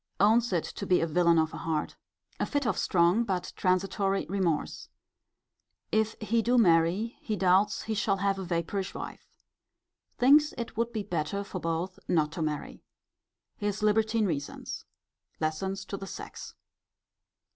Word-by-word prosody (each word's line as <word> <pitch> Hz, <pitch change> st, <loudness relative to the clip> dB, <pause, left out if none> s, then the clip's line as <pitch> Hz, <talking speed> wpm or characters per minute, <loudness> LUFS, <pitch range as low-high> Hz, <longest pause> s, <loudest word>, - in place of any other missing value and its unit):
Owns 225 Hz, +3 st, +4 dB
it 170 Hz, -3 st, +1 dB
to 200 Hz, -, -6 dB
be 180 Hz, -, +4 dB
a -, -, +1 dB
villain 170 Hz, +1 st, +3 dB
of 160 Hz, 0 st, +1 dB
a -, -, -5 dB
heart. 160 Hz, -2 st, -2 dB, 0.4 s
A -, -, +1 dB
fit 285 Hz, -2 st, -1 dB
of 220 Hz, -6 st, +1 dB
strong, 175 Hz, +5 st, +3 dB
but 190 Hz, -5 st, -3 dB
transitory 195 Hz, +1 st, +1 dB
remorse. 180 Hz, -5 st, -1 dB, 1.0 s
If 220 Hz, 0 st, +1 dB
he 225 Hz, +2 st, +1 dB
do 245 Hz, +3 st, +2 dB
marry, 180 Hz, +2 st, +3 dB
he 215 Hz, -, -2 dB
doubts 195 Hz, +2 st, +3 dB
he 220 Hz, -, -2 dB
shall 200 Hz, -1 st, +1 dB
have 195 Hz, 0 st, 0 dB
a -, -, -3 dB
vapourish 180 Hz, +2 st, -2 dB
wife. -, -, -7 dB, 0.9 s
Thinks 295 Hz, +4 st, +5 dB
it 235 Hz, -2 st, -5 dB
would 230 Hz, +1 st, 0 dB
be 215 Hz, -3 st, -3 dB
better 175 Hz, +3 st, -2 dB
for 195 Hz, -2 st, -6 dB
both 165 Hz, +3 st, -3 dB
not 155 Hz, -3 st, +2 dB
to 165 Hz, 0 st, -5 dB
marry. 150 Hz, -2 st, -3 dB, 0.8 s
His 205 Hz, +1 st, -2 dB
libertine 220 Hz, +1 st, +2 dB
reasons. 145 Hz, -6 st, -4 dB, 0.5 s
Lessons 190 Hz, +5 st, -2 dB
to 200 Hz, -, -5 dB
the 195 Hz, -, -7 dB
sex. -, -, -8 dB
195 Hz, 155 wpm, -29 LUFS, 170-215 Hz, 1.0 s, Thinks